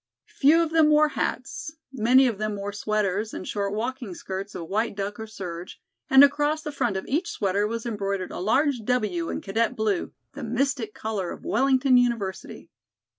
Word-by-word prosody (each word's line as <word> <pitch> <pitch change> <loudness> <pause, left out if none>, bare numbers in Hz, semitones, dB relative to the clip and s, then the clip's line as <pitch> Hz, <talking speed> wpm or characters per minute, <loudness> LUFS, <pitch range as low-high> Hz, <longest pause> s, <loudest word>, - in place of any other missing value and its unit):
Few 300 +4 +5
of 325 - -3
them 320 -2 +5
wore 305 0 +5
hats; 415 +1 -3 0.2
many 255 +2 +5
of 230 -5 -1
them 215 -1 -2
wore 200 0 -5
sweaters 210 0 -1
and - - -6
short 200 -1 -2
walking 235 -1 -4
skirts 195 +3 -6
of 165 - -6
white 220 +3 -1
duck 200 +1 -4
or 220 - -6
serge, 180 -4 -7 0.3
and 265 +1 +9
across 295 +2 +2
the 300 - -4
front 240 -8 -1
of 190 - -5
each 320 +6 -1
sweater 200 0 0
was 230 +1 -4
embroidered 200 -4 -3
a - - -6
large 260 - +2
"W" 210 -8 -1
in - - -3
cadet 225 +5 0
blue, 215 -5 -1 0.2
the - - -7
mystic 245 -1 -1
color 210 -5 -3
of - - -9
Wellington 260 +2 +3
University. 230 -6 -2
220 Hz, 180 wpm, -25 LUFS, 200-265 Hz, 0.3 s, and